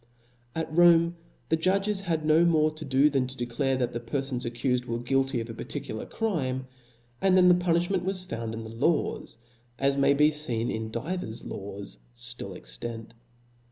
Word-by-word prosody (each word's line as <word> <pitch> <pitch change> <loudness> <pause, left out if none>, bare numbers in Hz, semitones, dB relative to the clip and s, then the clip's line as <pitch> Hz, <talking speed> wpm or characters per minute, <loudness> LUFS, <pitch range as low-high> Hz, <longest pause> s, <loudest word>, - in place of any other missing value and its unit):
At 160 -1 -3
Rome 170 0 +6 0.3
the 160 - +4
judges 195 +4 +1
had 165 -5 -1
no 155 +2 +5
more 155 -2 +4
to 155 +1 -8
do 135 0 +4
than 135 -3 +1
to 130 +1 -7
declare, 120 +3 0
that 125 -1 -1
the 120 - -2
perfon 130 +2 -2
accufed 125 +1 -1
were 115 -1 -2
guilty 135 +1 0
of 115 - -6
a 115 - -7
par - - -7
• - - -17 0.2
ticular 110 - -6
crime, 135 - -1 0.6
and 190 -1 +4
then 180 -1 +7
the - - +8
punilhment 175 +1 +1
was 185 0 -2
found 115 -5 -4
in 115 - -6
the 110 0 -8
laws, 145 -2 0 0.4
as 140 +1 +1
may 140 0 +4
be 150 +2 +5 0.2
leen 115 0 -1
in 110 0 -3
divers 120 -1 -4
laws 100 -6 -6 0.2
ftill - - -4
ex - - -9
tant. 115 -1 -6
135 Hz, 190 wpm, -27 LUFS, 120-170 Hz, 0.6 s, the